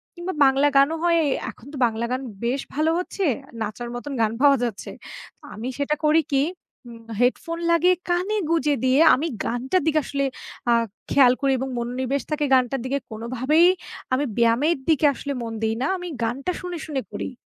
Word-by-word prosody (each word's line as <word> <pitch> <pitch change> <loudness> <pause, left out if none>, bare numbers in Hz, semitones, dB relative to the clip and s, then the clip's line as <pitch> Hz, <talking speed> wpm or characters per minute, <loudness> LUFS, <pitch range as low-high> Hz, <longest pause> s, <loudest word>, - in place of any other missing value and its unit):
কিংবা, 350 +2 -4
বাংলা 270 +2 +4
গানও 280 +4 +4
হয় 340 -1 +3
এ - - +1 0.2
এখন 220 - -19
তো - - -6
বাংলা 230 0 -1
গান 255 +1 -1 0.2
বেশ 255 +4 0
ভালো 310 +3 +1
হচ্ছে, 375 +2 -4 0.4
নাচার 220 +3 -4
মতন 275 +4 -6
গান 220 -1 +2
পাওয়া 280 -1 +6
যাচ্ছে। 230 -5 -4 0.6
আমি 225 +3 -6
সেটা 285 +1 0
করি 310 +2 +5
কি 270 0 +4 0.5
উম 230 -1 -11 0.2
headphone 330 +7 0
লাগিয়ে 350 +2 +4
কানে 365 +5 0
গুঁজে 310 -3 +2
দিয়ে 260 +2 +3 0.2
আমি 300 +6 -2 0.2
গানটার 260 +10 0
দিকে 310 -1 +3
আসলে 275 -1 -1 0.5
আ - - +6 0.4
খেয়াল 260 -3 +6
করি 275 -1 +2
এবং 265 +1 -3
মনোনিবেশ 255 +3 -2
থাকে 300 -1 0
গানটার 255 0 +2
দিকে। 270 +2 0
কোনোভাবেই 255 +9 +2 0.5
আমি 275 +3 +1
ব্যায়ামের 235 +8 +3
দিকে 310 -1 +3
আসলে 280 +1 -5
মন 230 -1 -5
দেই 220 0 0
না 265 - +1
আমি 355 0 -7 0.2
গানটা 260 +9 -2
শুনে, 360 -1 -5
শুনে 285 -4 -3
করি। - - -5
275 Hz, 180 wpm, -23 LUFS, 245-315 Hz, 0.6 s, পাওয়া